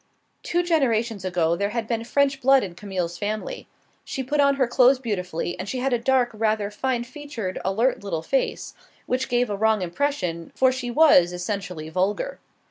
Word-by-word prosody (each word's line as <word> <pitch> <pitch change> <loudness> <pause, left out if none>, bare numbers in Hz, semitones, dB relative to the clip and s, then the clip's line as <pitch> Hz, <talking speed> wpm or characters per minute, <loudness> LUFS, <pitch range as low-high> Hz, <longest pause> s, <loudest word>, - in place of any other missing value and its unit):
Two 350 +1 0
generations 235 - +1
ago 170 -3 +1
there 200 +3 -1
had 225 0 -3
been 230 -1 -1
French 275 +2 +1
blood 270 +1 +5
in 185 - -5
Camille's 180 -3 -4
family. 215 - -4 0.4
She 265 - -4
put 290 +3 -1
on 280 -1 +4
her 270 -2 +2
clothes 250 +2 +4
beautifully; 180 -8 -3
she 255 - -4
had 260 +1 0
a 240 - +2
dark, 250 0 +2
rather 215 -1 0
fine 245 +2 -1
featured, 245 -7 -6
alert 220 +5 +1
little 165 -5 -3
face, 270 +10 -1 0.3
which 255 +1 -1
gave 245 0 +2
a 205 - -2
wrong 220 -1 +2
impression, 180 - -2
for 260 -1 +4
she 255 -1 -4
was 240 - +5
essentially 180 -3 -4
vulgar. 200 - -1
230 Hz, 175 wpm, -24 LUFS, 190-265 Hz, 0.4 s, blood